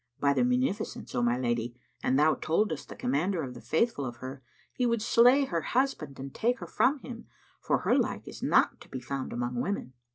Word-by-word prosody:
By 140 0 +3
the 245 - +2
munificence, 250 -3 -1
O 120 - 0
my 120 0 +2
lady, 120 -1 -2 0.2
an 130 - +1
thou 150 +3 +5
toldest 160 +2 -1
the - - -8
Commander 160 +7 0
of 130 -2 -6
the 120 - -10
Faithful 165 -3 0
of 120 -2 -4
her, 130 +3 -8 0.3
he 250 - +1
would 235 -1 +1
slay 245 +5 +5
her 170 -9 -1
husband 235 - -1
and 135 0 -7
take 245 +3 +1
her 180 - -7
from 265 - +2
him, 235 -2 -9 0.3
for - - +1
her - - +3
like - - -1
is - - -9
not - - +3
to - - -14
be 130 - -5
found 130 +2 -4
among 120 0 -2
women. 185 -9 -3
155 Hz, 215 wpm, -29 LUFS, -, 0.3 s, thou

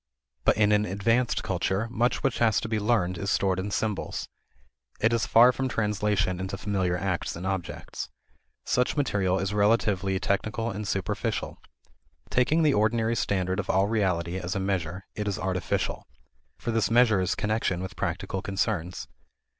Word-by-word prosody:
But - - +4
in 105 -1 +4
an 105 0 +4
advanced 115 +6 +1
culture 95 +4 -1
much 120 +1 0
which 135 - 0
has 110 -3 +3
to - - -4
be 110 -1 0
learned 100 -5 +1
is 100 - -2
stored 95 -2 +1
in 95 +2 -3
symbols. 105 0 -2 0.7
It 110 +2 +3
is 115 -2 +1
far 120 +2 +7
from 130 +1 -2
translation 105 -4 0
into 95 +1 -4
familiar 95 -4 0
acts 95 -2 -2
and 85 +2 -6
objects. 95 -2 -4 0.6
Such 125 +4 +1
material 100 -9 +1
is 95 +1 -2
relatively 100 -2 +2
technical 110 +3 -1
and 105 0 -5
superficial. 95 -1 -2 0.7
Taking 155 +6 +3
the 150 -2 +4
ordinary 110 +1 +2
standard 95 -4 0
of - - -4
reality 95 -3 +1
as 90 0 -4
a - - 0
measure, 95 -2 -2
it 105 -1 -4
is 100 - -1
artificial. 95 -1 -2 0.5
For 120 - -3
this 110 -2 +1
measure 115 -4 +4
is 90 - 0
connection 105 -4 0
with 95 -1 -6
practical 95 - -3
concerns. 95 -2 -2
100 Hz, 160 wpm, -27 LUFS, 95-110 Hz, 0.7 s, far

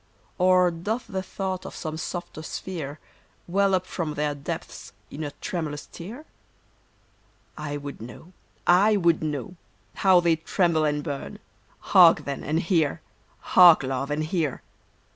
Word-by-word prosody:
Or 180 -1 +4
doth 205 +9 -3
the 190 -1 -4
thought 190 -1 -4
of - - -8
some 155 -1 -5
softer 175 0 -6
sphere 160 -3 -6 0.5
Well 195 +2 +2
up 185 0 -1
from 160 -5 -4
their 150 0 -1
depths 140 -1 -7 0.2
in 155 - -6
a 145 - -3
tremulous 155 -5 -4
tear? 230 - -10 1.3
I 145 -1 -4
would 145 -4 -8
know! 125 +10 -11 0.3
I 205 +4 +5
would 170 -3 +2
know! 150 +2 -4 0.4
How 190 -2 +5
they 170 -2 +2
tremble 165 -1 +1
and 150 0 -1
burn! 140 -3 -5 0.6
Hark, - - +7
then, 140 -1 -4
and 160 +3 0
hear! 165 -4 +1 0.5
Hark, 175 -5 +8
Love, 135 +1 -2
and 150 +1 -1
hear 155 -4 -2
165 Hz, 145 wpm, -25 LUFS, 150-185 Hz, 1.3 s, Hark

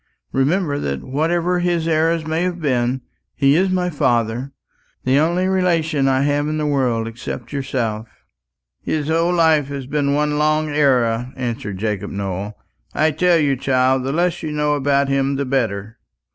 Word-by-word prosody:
Remember 145 +2 +1
that 70 - -3
whatever 170 +6 0
his 175 -2 0
errors 165 0 +1
may 160 +1 -1
have 180 -1 -1
been, 130 -3 0 0.3
he 140 0 +3
is 190 +3 +3
my 180 -1 0
father 120 -2 0 0.5
the 130 +2 +3
only 170 +4 +1
relation 165 -6 +1
I 130 0 +2
have 145 +1 +1
in 155 0 -2
the 155 - -1
world 125 -6 0
except 120 +2 -7
yourself." 120 -5 -2 0.7
"His 155 -1 -2
whole 165 +2 +2
life 160 -5 +3
has 140 -2 -5
been 140 0 0
one 150 0 0
long 155 0 +1
error," 125 -5 +1
answered 115 -6 -4
Jacob 105 -1 -2
Nowell. 100 +1 -4 0.4
"I 155 +1 +3
tell 175 +3 +3
you, 145 -3 +2
child, 130 0 +1
the 135 - -2
less 175 +3 0
you 155 - -4
know 150 0 0
of 140 -1 +1
him 135 0 +1
the 140 +1 -1
better." 115 -4 -2
140 Hz, 165 wpm, -20 LUFS, 125-160 Hz, 0.7 s, he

